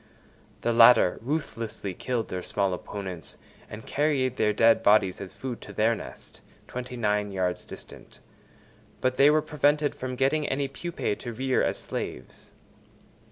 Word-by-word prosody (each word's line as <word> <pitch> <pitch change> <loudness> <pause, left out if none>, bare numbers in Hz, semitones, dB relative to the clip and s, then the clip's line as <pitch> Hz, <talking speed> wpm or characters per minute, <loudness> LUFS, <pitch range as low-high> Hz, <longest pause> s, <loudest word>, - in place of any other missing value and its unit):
The 120 - +1
latter 115 -5 +6
ruthlessly 115 - -4
killed 120 +4 -3
their 90 - -3
small 100 +1 -1
opponents 90 -4 -7 0.3
and 105 +1 -9
carried 140 -4 0
their 105 -3 +3
dead 115 +2 +4
bodies 100 -3 +3
as 95 - -7
food 130 -3 -6
to - - -10
their 110 +2 +3
nest, 110 - -10 0.3
twenty 125 0 -6
nine 105 -2 0
yards 90 -2 -2
distant; - - -12 0.8
but 130 0 0
they 140 +1 +7
were 155 0 +3
prevented 150 -1 +1
from 130 0 -5
getting 140 +4 +1
any 140 +1 0
pupæ 140 -6 -3
to 120 - -6
rear 130 +3 +1
as - - 0
slaves. 65 - -6
120 Hz, 150 wpm, -27 LUFS, 105-135 Hz, 0.8 s, they